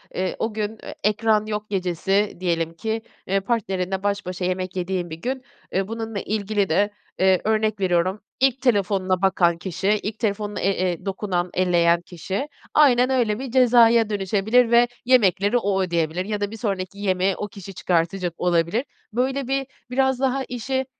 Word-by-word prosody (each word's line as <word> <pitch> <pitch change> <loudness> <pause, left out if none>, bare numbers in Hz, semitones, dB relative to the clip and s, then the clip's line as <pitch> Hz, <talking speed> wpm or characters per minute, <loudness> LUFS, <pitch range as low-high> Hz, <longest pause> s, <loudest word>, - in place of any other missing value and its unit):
Eee, 185 0 -1
o 220 -1 -1
gün, 215 0 -3
eee, - - -8
ekran 215 0 +2
yok 210 0 -4
gecesi 195 +1 0
diyelim 165 -2 -1
ki, 220 +6 -3 0.3
eee, 195 +1 +2
partnerinle 195 -3 -2
baş 200 0 -1
başa 180 0 -3
yemek 185 0 -2
yediğin 180 -1 -2
bir 160 - -6
gün, 260 +1 -3 0.3
eee, 190 +1 0
bununla 225 -2 -4
ilgili 205 -1 -1
de, 200 +6 +2 0.3
eee, 190 -1 +4
örnek 215 -1 +1
veriyorum, 185 +1 +1 0.2
ilk 265 0 +2
telefonuna 195 -6 +1
bakan 175 -3 +3
kişi, 190 +2 -4 0.2
ilk 210 +1 -4
telefonuna 210 -2 -2
e 185 -1 +1
e 175 +2 -7
dokunan, 190 -2 -2
elleyen 175 -2 +3
kişi 190 - -4 0.3
Aynen 255 -4 +5
öyle, 240 -5 +1
bir 265 -2 -5
cezaya 235 -3 +5
dönüşebilir 210 +4 +2
ve 240 +1 +6 0.2
yemekleri 210 -3 +4
o 200 -4 0
ödeyebilir 170 0 -1
ya 210 0 -3
da 205 0 -1
bir 225 - -7
sonraki 195 -3 -3
yemeğe 190 -1 +1
o 210 - -3
kişi 195 -1 -10
çıkartacak 175 0 0
olabilir. 175 - +1 0.3
Böyle, 260 +2 0
bir, 270 0 -1 0.2
biraz 265 0 +2
daha 265 0 +1
işi, 260 +2 -3
200 Hz, 165 wpm, -23 LUFS, 185-225 Hz, 0.3 s, ve